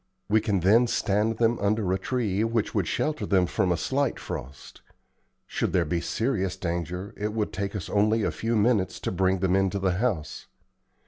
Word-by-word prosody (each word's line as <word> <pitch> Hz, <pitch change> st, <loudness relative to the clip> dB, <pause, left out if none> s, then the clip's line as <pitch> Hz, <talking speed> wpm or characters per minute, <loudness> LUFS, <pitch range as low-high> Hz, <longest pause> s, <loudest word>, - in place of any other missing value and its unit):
We 110 Hz, +1 st, +3 dB
can 100 Hz, -4 st, 0 dB
then 110 Hz, +7 st, +5 dB
stand 110 Hz, 0 st, 0 dB
them 115 Hz, 0 st, +2 dB
under 100 Hz, -2 st, +1 dB
a 95 Hz, -, 0 dB
tree 110 Hz, -2 st, -1 dB
which 115 Hz, -1 st, 0 dB
would 100 Hz, -5 st, 0 dB
shelter 155 Hz, 0 st, -1 dB
them 95 Hz, -3 st, +3 dB
from 90 Hz, +1 st, 0 dB
a 85 Hz, -, +1 dB
slight 135 Hz, -, 0 dB
frost. 65 Hz, +2 st, -8 dB, 0.6 s
Should -, -, -2 dB
there 90 Hz, -2 st, +3 dB
be 85 Hz, +2 st, -1 dB
serious 95 Hz, -6 st, -1 dB
danger 90 Hz, +2 st, -4 dB
it 105 Hz, +1 st, -3 dB
would 110 Hz, -2 st, -2 dB
take 100 Hz, +2 st, -3 dB
us 100 Hz, -, -4 dB
only 110 Hz, +2 st, +2 dB
a -, -, +1 dB
few 115 Hz, +1 st, -2 dB
minutes 105 Hz, -3 st, +2 dB
to -, -, -2 dB
bring 95 Hz, 0 st, +1 dB
them 95 Hz, -1 st, +2 dB
into 95 Hz, 0 st, +1 dB
the 95 Hz, -2 st, 0 dB
house. 95 Hz, -12 st, -2 dB
100 Hz, 190 wpm, -26 LUFS, 95-110 Hz, 0.6 s, then